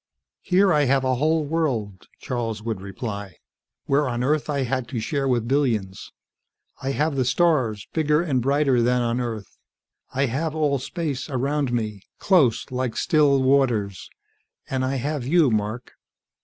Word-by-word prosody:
"Here 190 0 +3
I 150 -1 +3
have 135 0 +2
a 130 0 +1
whole 155 +4 +1
world," 120 - -2
Charles 115 -4 -3
would 110 -4 -3
reply, 100 -1 -6 0.5
"where 140 0 +2
on 120 0 -2
Earth 150 +3 0
I 140 -2 0
had 130 -1 -2
to 115 0 -4
share 135 +5 -1
with 120 -3 0
billions. 115 -8 -1 0.7
I 135 - -2
have 150 +1 0
the 130 - +1
stars, 130 - +1
bigger 150 -1 +2
and 135 -7 0
brighter 135 -1 +2
than 125 +1 +2
on 120 +1 0
Earth. 110 -5 -6 0.5
I 135 +2 +1
have 150 +5 -2
all 145 -3 +1
space 145 -1 -4
around 140 0 -1
me, 110 -4 -2 0.2
close, 155 - +2
like 125 -2 -2
still 145 -4 +3
waters. 120 -8 +1 0.6
And 130 -1 -1
I 130 +1 -1
have 135 0 -3
you, 155 -3 +4
Mark." 110 +2 -2
130 Hz, 155 wpm, -23 LUFS, 115-145 Hz, 0.7 s, you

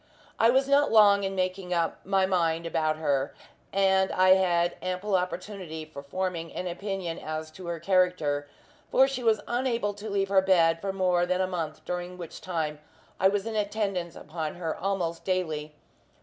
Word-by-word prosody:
I 225 - +6
was 265 +2 +3
not 285 +1 +4
long 205 -2 +6
in 195 0 -2
making 185 -1 -1
up 165 -1 0
my 195 0 +2
mind 170 -3 +1
about 155 -2 0
her; 140 -3 0 0.4
and 190 -1 +3
I 185 0 +3
had 175 -2 +4
ample 185 +2 -1
opportunity 180 -3 -3
for 155 -2 -9
forming 170 +2 -3
an 185 - -4
opinion 180 -1 -4
as 155 0 -5
to 180 +2 -10
her 170 -1 -3
character, 170 -5 +1 0.4
for 265 +1 +5
she 270 -2 -4
was 225 -3 +2
unable 240 -4 0
to 205 +2 -7
leave 195 -1 0
her 195 -1 +5
bed 165 -3 +3
for 195 - -2
more 180 -2 +1
than 185 0 0
a 185 - +2
month, 170 -4 -4
during 180 0 -4
which 170 -3 -8
time 160 -4 -3 0.4
I 190 - +5
was 200 +1 0
in 225 -1 -4
attendance 200 -5 -1
upon 155 0 -5
her 165 -2 -3
almost 180 -3 -2
daily. 155 -5 -2
185 Hz, 175 wpm, -27 LUFS, 165-195 Hz, 0.4 s, I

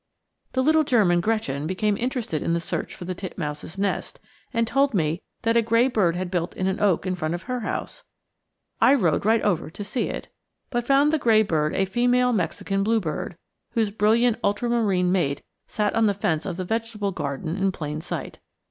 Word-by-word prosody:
The 260 - +1
little 315 +2 +4
German 200 - +3
Gretchen 165 -10 -1
became 205 +3 0
interested 235 - -2
in 165 - 0
the 170 - +1
search 170 - -4
for 180 - -8
the 185 - -3
titmouse's 170 -3 -6
nest, 200 0 -2 0.3
and 230 0 +1
told 275 +2 +2
me 160 -1 0 0.2
that 230 0 +2
a 235 - +6
gray 230 +2 +3
bird 185 -9 +2
had 180 0 -3
built 175 -2 -2
in 185 - -1
an 190 +1 0
oak 195 -4 +2
in 185 - 0
front 165 -2 -2
of 175 - -7
her 250 0 -3
house. 215 - -4 0.8
I 270 - +7
rode 185 - +1
right 225 0 +3
over 180 -7 0
to 205 - -7
see 210 +5 -2
it, - - -6 0.4
but 240 -2 -1
found 280 +2 +4
the 315 - +2
gray 220 -4 +4
bird 155 -5 0
a 195 - +2
female 245 +4 +2
Mexican 195 -1 -1
bluebird, 195 -5 -1 0.4
whose 220 -3 +1
brilliant 225 +3 +3
ultramarine 205 -4 +1
mate 145 -7 0 0.2
sat 210 -1 -1
on 225 -1 +3
the 200 - +1
fence 160 -5 -1
of 170 - -4
the 185 - -3
vegetable 220 -1 -2
garden 150 0 -3
in 195 -1 +1
plain 155 -4 -5
sight. - - -6
200 Hz, 195 wpm, -24 LUFS, 175-230 Hz, 0.8 s, I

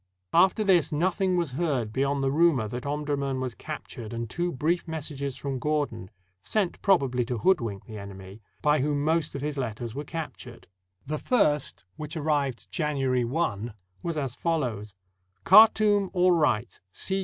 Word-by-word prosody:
After 190 +5 +4
this 185 -6 +3
nothing 180 +4 +1
was 170 -5 -1
heard 130 -7 -1
beyond 140 +1 0
the 135 - +1
rumor 150 -7 +3
that 125 +5 -5
Omdurman 140 -2 -1
was 130 -2 -3
captured 125 -7 -8
and 115 0 -3
two 175 +9 -2
brief 170 +6 -1
messages 145 -4 -4
from 135 -2 -4
Gordon, 145 -9 -2 0.3
sent 200 - -1
probably 135 -11 +3
to 120 0 -3
hoodwink 115 - +1
the 110 -2 -8
enemy, 100 +1 -10 0.2
by 150 0 +4
whom 145 +1 0
most 160 -1 +1
of 140 - -4
his 145 -1 -2
letters 115 -2 -4
were 145 - -4
captured. 145 -6 -7 0.4
The 150 +2 -3
first, 150 - +1
which 155 +2 -6
arrived 145 -5 -1
January 135 -6 0
i, 120 -5 -1 0.3
was 170 -2 -3
as 135 -4 -2
follows: 120 - -2 0.5
"Khartoum 210 -1 +6
all 180 0 +4
right. 145 -10 +1
145 Hz, 155 wpm, -27 LUFS, 125-165 Hz, 0.5 s, Khartoum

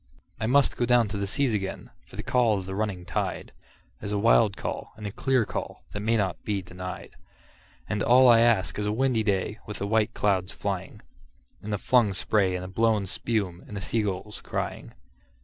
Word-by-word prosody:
I 110 - -1
must 140 +2 +3
down 120 -1 +5
go 100 - -7
to 100 - -2
the 100 0 -2
seas 135 +3 +1
again, 95 -2 -4 0.2
for - - -14
the - - -5
call 120 -4 +2
of 95 - -5
the 95 - -5
running 100 -3 -2
tide 90 - -3 0.5
Is 100 - -4
a 105 - 0
wild 110 -1 +4
call - - -5
and 105 - -8
a 100 - -3
clear 130 +1 +1
call - - -5
that 105 - -4
may 110 +2 +1
not 95 -4 -1
be 100 -3 -2
denied; 90 +1 -8 0.7
And 105 -1 -2
all 125 +3 +6
I 115 -2 +7
ask 115 -4 +2
is 105 - -1
a - - +1
windy 125 0 +1
day 105 +1 -1
with 105 - -5
the 100 - -3
white 110 +1 +1
clouds 95 -2 +1
flying, 95 -1 -5 0.6
And 105 - -6
the 105 - 0
flung 110 -2 +3
spray 95 -2 +1
and 90 - -4
the - - -6
blown 110 +1 +1
spume, 95 -3 -2
and 105 - -7
the - - -2
sea 115 +4 0
gulls 105 +1 -4
crying. - - -5
105 Hz, 210 wpm, -26 LUFS, 95-115 Hz, 0.7 s, I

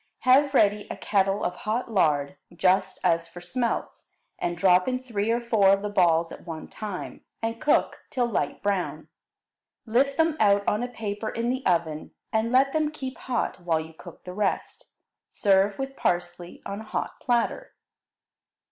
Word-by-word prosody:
Have 275 +2 +4
ready 210 -2 +3
a - - -5
kettle 195 -1 +1
of 180 - -2
hot 230 +3 -2
lard, 145 -8 +2 0.2
just 185 +2 +2
as 170 -2 +2
for 175 - -11
smelts, 235 +7 -3 0.3
and 175 0 -2
drop 180 0 +4
in 255 0 +1
three 225 -5 -3
or 235 +1 +2
four 225 -5 +3
of 195 +1 +3
the 210 - -3
balls 170 -4 +3
at - - -11
one 160 -2 -6
time, 205 -4 -7 0.2
and 230 +1 -3
cook 295 - +2
till 250 -2 0
light 235 - -2
brown. 200 -3 -2 0.8
Lift 265 +5 +2
them 320 -1 +2
out 200 -1 +3
on 210 - +1
a 245 - -1
paper 220 -2 -4
in 235 +1 -1
the 260 +1 -3
oven, 165 -4 -1 0.2
and 220 +1 +1
let 270 +2 +4
them 310 -1 +1
keep 265 -4 -6
hot 245 -5 -2
while 170 -3 0
you 160 +1 -8
cook - - -13
the 180 - -8
rest. 205 +1 -2 0.4
Serve 195 0 +2
with 270 0 -4
parsley 175 -2 -2
on 200 +2 -5
a - - -10
hot - - -4
platter. 245 - -1
205 Hz, 175 wpm, -26 LUFS, 180-245 Hz, 0.8 s, Have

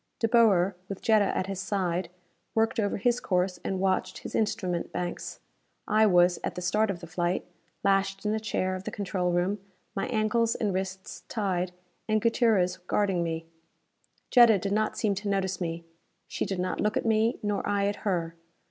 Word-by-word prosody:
De 225 - +1
Boer, 200 -5 +4
with 195 - -5
Jetta 215 -3 +4
at 185 - -1
his 195 -1 -4
side, 185 -3 -1 0.5
worked 225 0 +2
over 205 -2 0
his 240 +4 +1
course 180 -1 0
and 190 - -2
watched 185 -1 0
his - - -8
instrument 185 -5 -1
banks. 175 -1 -4 0.5
I 215 +1 +4
was, 175 -2 +4
at - - -3
the 180 - -4
start 210 +5 +2
of 180 -3 -3
the - - -7
flight, 175 +1 -1 0.4
lashed 195 0 +1
in 210 - +1
a 220 - 0
chair 185 -3 -1
of 185 +1 -6
the - - -2
control 185 -3 -1
room, 180 +4 0 0.4
my 195 - -1
ankles 230 0 +1
and 205 -3 -1
wrists 190 0 -4
tied 185 -5 -1 0.4
and 215 0 +2
Gutierrez 220 -5 +2
guarding 185 0 0
me. 165 -1 -3 0.9
Jetta 235 -4 +7
did 195 +1 -3
not 215 +1 0
seem 210 -2 +1
to 200 +1 -4
notice 190 -2 -1
me. 165 -1 -3 0.4
She - - -2
did 195 - -2
not 185 +1 -2
look 210 0 +1
at - - -2
me, 225 +2 +2
nor 205 -1 0
I 200 -1 +1
at 205 0 -1
her. 170 -5 -1
195 Hz, 185 wpm, -28 LUFS, 180-215 Hz, 0.9 s, Jetta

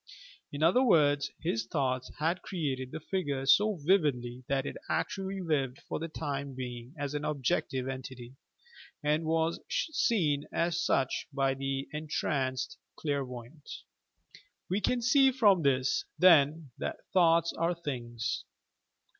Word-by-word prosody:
In 145 +2 -3
other 180 +10 +5
words: 145 - +4
his 115 -9 -1
thoughts 130 -2 -1
had 165 +4 0
created 135 -8 -3
the 160 - -5
figure 145 -6 -2
so 205 +10 +5
vividly 145 -8 +1
that 135 -1 0
it - - -4
actually 195 0 -2
lived 140 -7 -1
for - - -3
the 165 - -3
time 140 -4 -4
being 125 +1 -7
as 145 -1 -3
an 150 0 -3
objective 135 -2 -1
entity, 130 -2 -7 0.7
and 150 +2 +1
was 160 +1 +1
seen 185 - +1
as 170 0 0
such 135 -1 0
by 135 -1 +1
the 135 0 -3
entranced 140 -4 -2 0.2
clairvoyant. 140 -1 -5 1.0
We 195 +3 +1
can 240 +4 +1
see 270 +2 +5
from 210 -8 +4
this, 130 -2 +1
then, 155 -4 +5
that - - -5
"thoughts 170 -2 +4
are 170 +1 0
things." 120 -8 -4
145 Hz, 130 wpm, -30 LUFS, 130-170 Hz, 1.0 s, other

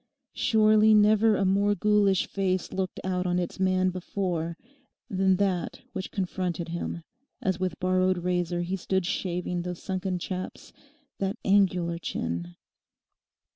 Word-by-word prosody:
Surely 215 -1 +4
never 215 +1 +5
a 195 - +1
more 200 +2 +3
ghoulish 205 -3 +3
face 185 -2 -1
looked 185 -1 -3
out 185 -1 -1
on 175 0 +1
its 180 +1 -3
man 185 0 +2
before 175 -2 -3 0.5
than 190 -1 +3
that 185 -2 -1
which 190 - -4
confronted 180 -3 -3
him 170 0 -4 0.4
as 190 -7 -1
with 185 -2 -2
borrowed 185 0 +2
razor 175 -1 -1
he 180 +2 -2
stood 190 0 -1
shaving 180 -1 -2
those 180 0 -5
sunken 185 -1 -2
chaps, 185 +1 -6 0.5
that 195 +3 -1
angular 180 -4 +2
chin. 85 - -4
185 Hz, 135 wpm, -27 LUFS, 175-195 Hz, 0.5 s, never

